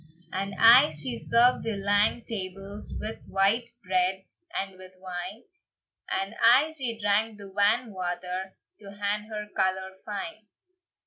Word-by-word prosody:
And 195 +1 -3
aye 245 +6 +8
she 135 -5 -3
served 235 - +3
the 225 -3 -2
lang 205 +3 +2
tables 195 -1 -6
With 220 +1 -6
white 205 +5 +2
bread 185 0 0 0.4
and 195 0 -3
with 185 0 -12
wine, 185 +5 -6 0.7
And 195 +2 -1
aye 265 +7 +6
she 245 -6 -2
drank 210 +1 +1
the 200 -2 -10
wan 210 +3 +2
water, 185 +1 -4 0.2
To 200 -1 -11
had 205 +1 -2
her 210 -1 -5
colour 190 0 0
fine. 210 +1 -6
200 Hz, 135 wpm, -27 LUFS, 190-220 Hz, 0.7 s, aye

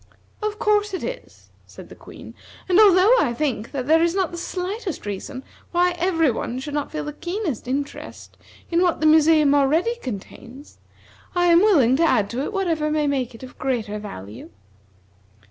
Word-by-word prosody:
"Of 425 0 -3
course 420 -3 +1
it - - -6
is," - - -8 0.2
said - - -13
the - - -12
Queen, - - -13 0.3
"and 370 +1 +4
although 400 +1 +6
I 240 -5 0
think 240 -6 -2
that 265 -3 -4
there 320 +3 +4
is 340 +1 +1
not 380 -4 0
the 345 - -7
slightest 370 - -5
reason 205 +6 -6 0.3
why 355 +1 +2
every 330 -5 +2
one 235 +2 -4
should 285 +3 -6
not 290 -1 -3
feel 305 -1 -4
the 295 0 -6
keenest 345 - -4
interest 280 +2 -5 0.4
in 340 +1 +2
what 355 -2 +1
the 310 - -1
museum 310 -2 +5
already 310 - +2
contains, 250 - -9 0.6
I 355 0 +2
am 335 - +7
willing 305 - +4
to 335 - +2
add 245 -11 +2
to 245 +3 -3
it 290 - -3
whatever 335 -7 -1
may 305 -1 0
make 260 -4 -2
it 225 - -13
of 255 - -12
greater 230 -5 -2
value." 105 - -9
310 Hz, 180 wpm, -22 LUFS, 260-360 Hz, 0.6 s, am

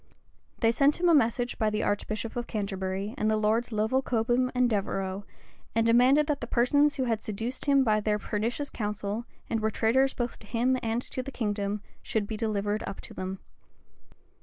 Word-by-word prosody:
They 225 -1 +5
sent 280 +6 +3
him 355 - +2
a - - +6
message 245 -3 +2
by 220 -2 +2
the 215 0 -1
archbishop 215 +2 -2
of 240 -1 -3
Canterbury, 195 -1 -3
and 215 - +2
the 215 - +2
lords 220 +3 +1
Lovel 220 +5 +1
Cobham, 245 +1 +1
and 250 0 +4
Devereux, 195 -2 -2 0.5
and 225 0 +3
demanded 250 +6 +5
that 295 -2 -1
the 235 - -4
persons 285 +6 +3
who 265 - 0
had 225 -3 0
seduced 225 +5 -3
him 280 -2 +4
by 215 -3 +3
their 210 0 +1
pernicious 225 +7 -2
counsel, 210 +1 -3 0.2
and 225 - -1
were 220 0 +1
traitors 260 +5 +2
both 240 -1 -3
to 210 - -11
him 245 +4 +1
and 230 +2 -1
to 255 - -4
the 275 +2 -7
kingdom, 205 -3 -2 0.2
should 220 -2 -1
be 220 - -4
delivered 210 -1 -1
up 195 - -6
to - - -8
them. 185 +1 -4
225 Hz, 190 wpm, -28 LUFS, 210-250 Hz, 0.5 s, a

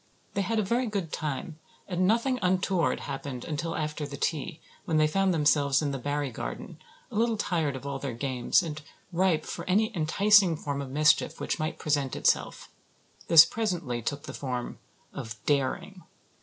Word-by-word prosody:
They 200 - 0
had 225 +4 -1
a 215 - +2
very 235 +5 0
good 195 -7 -3
time 155 +2 -4 0.3
and 185 0 +1
nothing 235 +4 +2
untoward 185 -2 +1
happened 135 -2 -6
until 165 +1 -3
after 150 -1 -3
tea, 145 +2 -3 0.3
when 160 - +1
they 155 - +5
found 195 +5 +2
themselves 145 -4 +3
in 145 -2 -1
the 135 - -4
Barry 145 +1 -2
garden, - - -7 0.3
a - - -8
little 225 +1 +2
tired 165 -8 -1
of 130 - -8
all 140 -1 -3
their 135 -4 -4
games 130 +6 +1
and 155 -2 -5 0.3
ripe 170 -3 +2
for - - -5
any 215 +4 +2
enticing 185 +2 +4
form 140 -2 -3
of 135 - -6
mischief 150 +3 +2
which - - -2
might 155 +1 -2
present 145 -4 0
itself. - - 0 0.6
This 165 -1 +10
presently 175 - -2
took 145 +5 -3
the - - -7
form 125 -3 -4 0.3
of 110 -1 -6
"daring." 145 +7 -1
155 Hz, 170 wpm, -28 LUFS, 140-185 Hz, 0.6 s, This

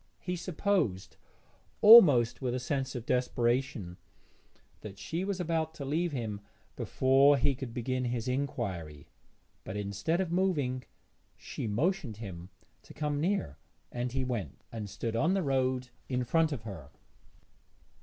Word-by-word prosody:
He 180 0 -3
supposed, 175 - -1 0.6
almost 150 - +8
with 125 -2 -1
a - - -1
sense 135 +1 -2
of 120 -2 -5
desperation, 120 -7 0 0.8
that 100 -2 -9
she 165 - -3
was 195 -1 -2
about 160 -2 -1
to 140 - -6
leave 165 +5 0
him 110 -7 -4 0.3
before 135 +2 +4
he 140 +2 +2
could 130 -2 -6
begin 125 +2 -2
his 120 -1 -2
inquiry, 100 - -3 0.5
but 100 - -5
instead 105 - -1
of 185 -3 -1
moving 150 -9 0 0.5
she - - -6
motioned 135 - -1
him 95 -5 -8 0.3
to - - -15
come 150 -1 -1
near, 165 - -1 0.3
and 120 0 -3
he 130 +1 -1
went, 120 -6 -4
and 110 -3 -6
stood 115 +3 -4
on 165 +11 +2
the 195 - 0
road 130 -2 0 0.2
in 125 -1 0
front 160 +6 +2
of 130 -7 -4
her. 95 -11 -8
130 Hz, 145 wpm, -30 LUFS, 115-155 Hz, 0.8 s, almost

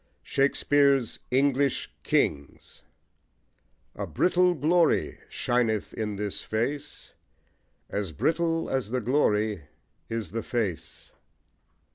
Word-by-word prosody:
SHAKESPEARE'S 140 -2 +2
ENGLISH 140 +1 +1
KINGS 70 0 -1 1.1
A - - -4
brittle 180 0 +2
glory 165 +4 +2
shineth 115 -4 0
in 105 -2 -3
this 105 0 -3
face: 120 +7 -4 0.7
As 100 -4 -3
brittle 165 - 0
as 130 -5 -1
the 125 +2 0
glory 105 - +1 0.4
is 115 -6 -4
the 115 +2 -2
face. 110 -10 -4
125 Hz, 90 wpm, -27 LUFS, 105-145 Hz, 1.1 s, SHAKESPEARE'S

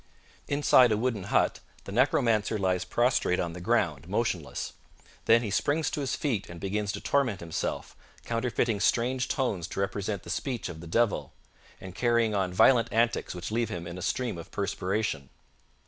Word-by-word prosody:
Inside 140 -4 +5
a 105 - +2
wooden 110 -4 -1
hut - - +1 0.2
the - - -8
necromancer 110 -2 +2
lies 95 -2 0
prostrate 120 -6 +1
on 85 -1 -2
the 90 - -8
ground, 85 - 0
motionless. 95 -7 -2 0.5
Then 115 +1 +5
he 105 - -3
springs 145 +8 +1
to 150 - -2
his 135 - -1
feet 115 -9 -2
and 85 -1 -9
begins 100 +2 -2
to - - -4
torment 125 -9 +1
himself, 85 -2 -4 0.3
counterfeiting 115 -2 0
strange 125 +4 +1
tones 105 - -1
to - - -6
represent 100 0 -2
the - - -7
speech 125 -9 -3
of 80 -2 -8
the 85 - -9
devil, 115 +4 0 0.5
and 95 -1 -9
carrying 115 0 +2
on 95 -3 0
violent 115 +5 +4
antics 115 -4 +1
which 90 +3 -5
leave 115 +1 0
him 85 -1 -5
in 85 +1 -7
a - - -8
stream 120 -2 -2
of 85 - -10
perspiration. 100 -6 -2
105 Hz, 175 wpm, -28 LUFS, 90-120 Hz, 0.5 s, Inside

